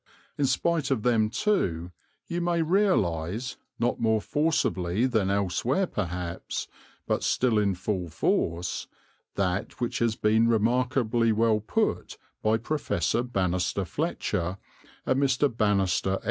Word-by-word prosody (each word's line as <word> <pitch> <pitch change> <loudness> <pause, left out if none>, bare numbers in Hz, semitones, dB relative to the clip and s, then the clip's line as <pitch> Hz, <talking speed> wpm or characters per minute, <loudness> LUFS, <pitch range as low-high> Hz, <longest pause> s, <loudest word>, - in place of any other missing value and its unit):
In 140 - +1
spite 165 0 +1
of 125 -6 0
them, 115 -3 +3
too, 90 - 0 0.3
you 175 +1 -3
may 170 -1 +1
realize, 125 - +1 0.2
not 120 +1 0
more 110 -1 +2
forcibly 110 - 0
than 110 -7 +1
elsewhere 100 - +1
perhaps, 90 - -4 0.4
but - - 0
still 120 -4 +2
in 100 -2 +1
full 90 -1 -3
force, 85 +2 -1 0.5
that 95 +1 -1
which 120 - -2
has 115 -2 +1
been 110 +2 +3
remarkably 120 0 +2
well 110 0 +3
put 105 - -1 0.2
by 110 +1 +2
Professor 115 - -1
Banister 95 -4 -1
Fletcher 90 +1 -2 0.5
and 130 +1 +1
Mr. 135 -1 +2
Banister 100 -4 +1
F. 95 - -1
110 Hz, 125 wpm, -27 LUFS, 95-130 Hz, 0.5 s, them